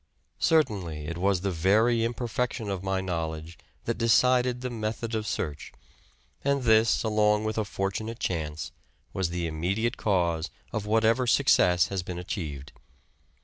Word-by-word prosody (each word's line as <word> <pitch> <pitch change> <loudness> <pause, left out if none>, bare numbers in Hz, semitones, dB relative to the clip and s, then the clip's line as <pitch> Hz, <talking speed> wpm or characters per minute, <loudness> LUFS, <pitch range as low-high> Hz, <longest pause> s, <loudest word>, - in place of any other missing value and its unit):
Certainly, 95 - +1
it 85 +2 -5
was 95 -1 +2
the 100 0 -1
very 110 +7 +3
imperfection 115 -2 -2
of 95 -2 -3
my 95 0 -1
know 85 -4 -2
ledge 80 +1 -8 0.3
that - - -2
decided 125 +2 +3
the 125 -1 -3
method 115 0 -3
of 110 -1 -2
search, 75 -1 -4 0.7
and 140 -1 +1
this, 110 -1 +4
along 105 -1 +2
with 110 +1 -1
a - - +1
fortunate 100 +4 -3
chance, 80 -6 -3 0.4
was 95 -3 -1
the 85 0 -2
immediate 90 +9 -1
cause 85 -5 0 0.2
of 105 -2 -3
whatever 115 +3 +3
success 90 - +4
has 95 -2 -2
been 90 0 -6
achieved. 80 -7 -5
100 Hz, 145 wpm, -27 LUFS, 85-115 Hz, 0.7 s, this